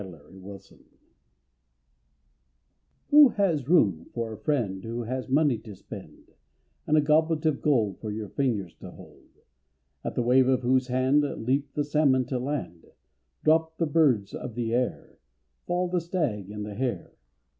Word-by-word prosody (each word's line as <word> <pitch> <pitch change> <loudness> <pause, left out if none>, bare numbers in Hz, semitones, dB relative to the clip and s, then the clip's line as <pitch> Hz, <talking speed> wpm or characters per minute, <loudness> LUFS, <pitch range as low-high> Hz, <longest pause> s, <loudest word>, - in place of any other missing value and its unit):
A - - -5
FRIEND 90 -5 -11 0.3
IN 100 -1 -12
NEED - - -25 2.3
Who 295 -2 +9
has 170 - 0
room 100 - +3
for 115 -2 -3
a - - -9
friend 110 -11 -1
Who 115 +1 -4
has 130 +3 -4
money 140 -4 +2
to 110 -3 -11
spend, - - -12 0.6
And 155 - +3
a - - +5
goblet 155 +1 +2
of 155 -3 +1
gold 115 -10 +1
For 110 - -6
your 105 -1 -5
fingers 110 -10 -2
to - - -9
hold, - - -16 0.7
At - - -4
the 120 - 0
wave 125 +2 +4
of 130 -1 +1
whose 130 +1 +2
hand 130 +3 +2
Leap 140 0 -2
the 150 - +1
salmon 145 -3 +2
to 130 - -1
land, 125 - -5 0.6
Drop 160 +1 +2
the 165 - +1
birds 140 -10 +2
of 120 - -7
the 115 -2 -2
air, 125 +1 -2 0.5
Fall 180 +1 0
the 180 0 -1
stag 150 - -2
and 105 0 -6
the 105 - -7
hare. 125 +3 -3
130 Hz, 165 wpm, -26 LUFS, 110-150 Hz, 2.3 s, Who